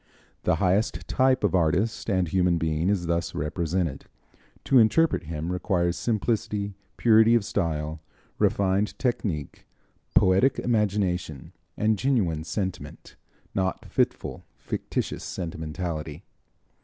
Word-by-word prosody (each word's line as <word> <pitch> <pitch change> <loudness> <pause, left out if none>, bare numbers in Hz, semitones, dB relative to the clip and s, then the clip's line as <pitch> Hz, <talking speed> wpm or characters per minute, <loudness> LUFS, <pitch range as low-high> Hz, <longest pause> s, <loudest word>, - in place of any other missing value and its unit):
The - - +3
highest 100 +3 0
type 130 -2 +2
of 105 - +2
artist 90 +7 +1
and 95 -3 +1
human 90 0 +2
being 80 +2 0
is 95 -4 0
thus 85 0 -1
represented. 80 0 -2 0.6
To 130 - +5
interpret 115 - +3
him 80 +2 -4
requires 90 -1 0
simplicity, 105 +1 -1 0.2
purity 115 0 +5
of 115 -4 +2
style, 80 -5 -2 0.4
refined 100 +1 +1
technique, 100 - -3 0.5
poetic 95 +9 +4
imagination 95 - -1 0.2
and 110 -1 +1
genuine 95 - +1
sentiment 95 +2 -5 0.4
not 95 -1 -1
fitful, - - -1
fictitious - - -3
sentimentality. 80 -2 -5
95 Hz, 105 wpm, -26 LUFS, 80-105 Hz, 0.6 s, To